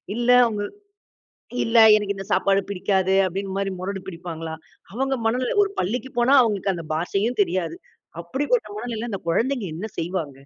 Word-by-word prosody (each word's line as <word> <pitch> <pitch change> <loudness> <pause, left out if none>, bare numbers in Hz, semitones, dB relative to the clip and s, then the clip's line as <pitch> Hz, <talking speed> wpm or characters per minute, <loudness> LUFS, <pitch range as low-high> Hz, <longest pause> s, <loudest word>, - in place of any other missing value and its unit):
இல்ல 240 +1 -1 0.2
அவுங்க 210 -2 -3 1.0
இல்ல 230 0 +3 0.2
எனக்கு 205 -1 -1
இந்த 195 0 -7
சாப்பாடு 195 0 +3
பிடிக்காது 190 0 +1
அப்படின்னு 195 +2 -4
மாரி 195 0 -1
முரடு 195 +1 -4
பிடிப்பாங்களா? 165 -3 -6 0.4
அவங்க 270 +3 -1
மனநில 250 - 0
ஒரு 400 - -5
பள்ளிக்கு 240 +7 -2
போனா 245 +3 +4
அவங்களுக்கு 200 -4 0
அந்தப் 165 -2 -8
பாஷையும் 195 +9 -1
தெரியாது. 185 - -2 0.5
அப்படிப்பட்ட 290 - 0
மனநிலைல 235 +1 -4
அந்தக் 190 -4 -5
கொழந்தைங்க 235 +3 0
என்ன 215 +6 -5
செய்வாங்க? 165 -4 -3
200 Hz, 150 wpm, -23 LUFS, 185-240 Hz, 1.0 s, போனா